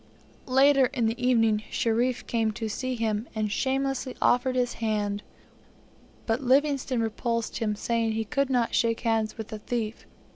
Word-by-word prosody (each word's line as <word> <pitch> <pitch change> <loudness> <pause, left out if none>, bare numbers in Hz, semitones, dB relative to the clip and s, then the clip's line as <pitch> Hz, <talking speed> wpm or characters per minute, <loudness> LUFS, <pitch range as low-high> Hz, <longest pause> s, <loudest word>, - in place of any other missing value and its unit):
Later 270 +1 +5
in 250 -4 -1
the 230 +3 -2
evening, 225 -4 +3
Sherif 240 +2 0
came 225 -2 0
to 225 +1 -4
see 255 +4 -3
him, 225 -1 -2
and 215 -1 -1
shamelessly 270 +1 -1
offered 255 +1 +2
his 245 -1 +1
hand, 205 -2 -1 1.0
but 225 +3 0
Livingstone 270 -1 +2
repulsed 230 +1 -2
him, 215 -3 0
saying 230 +1 0
he 220 0 -2
could 275 +3 0
not 245 -3 +1
shake 230 -1 +1
hands 225 -2 0
with 220 0 -7
a 215 - -5
thief. 225 0 -4
230 Hz, 155 wpm, -27 LUFS, 220-255 Hz, 1.0 s, Later